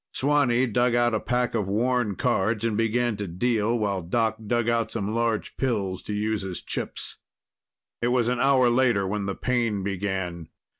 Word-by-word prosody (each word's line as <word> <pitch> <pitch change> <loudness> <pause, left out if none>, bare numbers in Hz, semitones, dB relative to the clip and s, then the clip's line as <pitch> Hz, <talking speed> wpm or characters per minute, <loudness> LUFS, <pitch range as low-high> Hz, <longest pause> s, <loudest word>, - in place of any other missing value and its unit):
Swanee 135 -3 +2
dug 120 0 +1
out 120 -1 +3
a 110 - +1
pack 125 +1 0
of 105 -4 -1
worn 115 0 +1
cards 110 -1 0
and 115 -2 0
began 115 +1 +1
to 100 -1 -4
deal 110 +5 0
while 100 -4 -1
Doc 110 +6 0
dug 120 0 +1
out 115 -1 +1
some 100 +2 -3
large 115 -1 -1
pills 100 -8 -1
to - - -7
use 105 0 -1
as 95 -2 -4
chips. - - -4 0.8
It 120 - +1
was 120 -1 +2
an 125 0 0
hour 135 -2 +4
later 120 -5 +3
when 100 +1 -2
the 100 - -2
pain 115 -6 0
began. 95 -4 -3
115 Hz, 180 wpm, -25 LUFS, 100-120 Hz, 0.8 s, hour